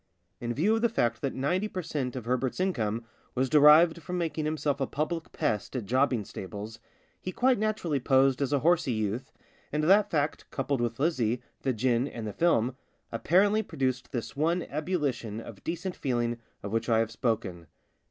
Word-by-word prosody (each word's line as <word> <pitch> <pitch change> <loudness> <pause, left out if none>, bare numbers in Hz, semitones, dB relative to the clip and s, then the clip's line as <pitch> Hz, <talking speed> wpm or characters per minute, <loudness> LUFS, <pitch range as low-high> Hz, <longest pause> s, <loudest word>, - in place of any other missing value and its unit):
In 120 0 -3
view 200 +10 +3
of - - -2
the 235 - +3
fact 120 - 0
that 135 - -2
ninety 180 +10 0
per 185 -3 -5
cent, 135 -5 -3
of 125 -3 -5
Herbert's 125 +3 -1
income 115 - -1 0.3
was 130 0 0
derived 155 +3 +7
from 180 +4 -4
making 160 -3 -1
himself 150 -2 -1
a 135 - +1
public 160 +3 -3
pest 105 +5 -2
at 120 -5 -2
jobbing 125 -1 +1
stables, 105 +5 -7 0.4
he 185 - -4
quite 250 +4 +2
naturally 205 -9 0
posed 135 +1 +3
as 140 - 0
a 140 -2 +2
horsey 165 -5 +3
youth, 110 +4 -2 0.4
and 150 +1 0
that 195 +6 +5
fact, 150 -1 -1
coupled 135 -1 -1
with 115 0 -2
Lizzie, 125 -7 +1 0.2
the 135 - +1
gin, 125 +2 +1
and 115 -5 -6
the 105 - -4
film, 130 -8 +2 0.4
apparently 200 +5 +3
produced 130 - -2
this 120 -3 -4
one 165 +4 +1
ebullition 145 - -2
of 115 -3 -10
decent 175 +2 -3
feeling 120 -3 -1 0.2
of 100 - -5
which 115 +2 -1
I 115 - +4
have 115 0 +1
spoken. 110 - -2
135 Hz, 180 wpm, -29 LUFS, 115-165 Hz, 0.4 s, derived